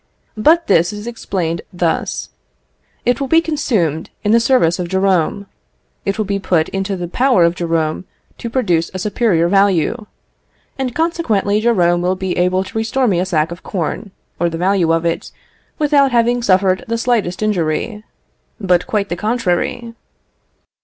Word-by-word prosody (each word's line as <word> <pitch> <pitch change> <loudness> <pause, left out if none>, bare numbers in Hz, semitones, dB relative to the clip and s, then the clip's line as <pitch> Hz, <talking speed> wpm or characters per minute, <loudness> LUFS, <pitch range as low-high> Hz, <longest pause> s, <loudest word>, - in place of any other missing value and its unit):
But 320 +10 +3
this 170 +2 +3
is 210 +1 -7
explained 185 -8 -3
thus: 175 -2 -2 0.8
It 245 +2 +1
will 275 - -1
be 325 +4 +5
consumed 215 - -1
in 210 - +1
the 230 - +5
service 230 -9 +2
of 180 - -2
Jerome. 190 +1 +1 0.6
It 195 +1 -1
will 215 - -1
put 170 -4 +1
it - - -21
into 195 +1 -2
the 175 -1 -4
power 245 -1 +3
of 170 0 +3
Jerome 165 -1 -1 0.3
to 235 - -5
produce 180 -10 0
a - - -1
superior 195 -4 +1
value; 200 +3 +2 0.7
and, 255 -2 -2
consequently, 225 -12 0
Jerome 175 -7 +2
will 180 +1 0
be 185 -1 -3
able 180 +1 +1
to 195 - -7
restore 250 +4 0
me 185 -5 +2
a 185 - -1
sack 160 -2 0
of 170 - -8
corn, 190 +3 -4 0.3
or 170 - +1
the 165 - -5
value 180 -1 +2
of 165 0 +1
it, 165 - -2 0.5
without 285 -3 +3
having 240 0 +2
suffered 190 -3 +2
the 230 0 -1
slightest 230 -6 0
injury: 210 +2 -1 0.6
but 180 -4 +1
quite 205 -2 -1
the 175 - -2
contrary. 230 +3 -1
195 Hz, 160 wpm, -17 LUFS, 175-230 Hz, 0.8 s, be